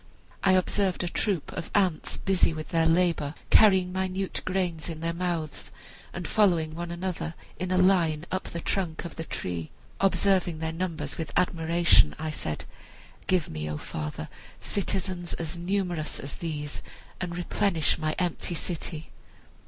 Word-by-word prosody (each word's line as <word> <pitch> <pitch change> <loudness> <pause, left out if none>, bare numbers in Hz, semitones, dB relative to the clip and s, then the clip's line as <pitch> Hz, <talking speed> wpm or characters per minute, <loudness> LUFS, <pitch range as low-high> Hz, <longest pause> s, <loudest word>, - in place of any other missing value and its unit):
I 190 - +5
observed 185 0 +2
a - - -1
troop 180 -2 -1
of 170 - -5
ants 185 -6 +2
busy 190 -4 +2
with 155 0 -6
their 165 -2 +3
labor, 165 -3 +2 0.2
carrying 190 -4 +6
minute 190 0 -1
grains 180 -4 -1
in 160 -2 -5
their 165 +1 -1
mouths 170 -3 -2 0.4
and - - -5
following 170 -7 +3
one 170 +1 -4
another 170 -2 -3 0.2
in 185 0 -2
a 185 - +2
line 175 -4 +4
up 185 - -1
the 170 - -5
trunk 175 -3 -1
of 170 - -6
the 165 - -4
tree. 85 - -3 0.3
Observing 190 -2 +3
their 160 0 -2
numbers 160 -5 -3
with 160 - -3
admiration, 170 - +4
I 155 0 -3
said, 80 - -3 0.6
'Give 180 -4 +2
me, 75 0 -4
O 75 - -2
father, 75 0 -5 0.3
citizens 185 -3 -1
as 165 0 -4
numerous 175 -3 -1
as 140 - -5
these, 150 -3 -4 0.4
and 175 -2 -3
replenish 175 -3 +1
my 155 -1 0
empty 175 -1 0
city.' 160 -1 -3
170 Hz, 150 wpm, -28 LUFS, 155-185 Hz, 0.6 s, carrying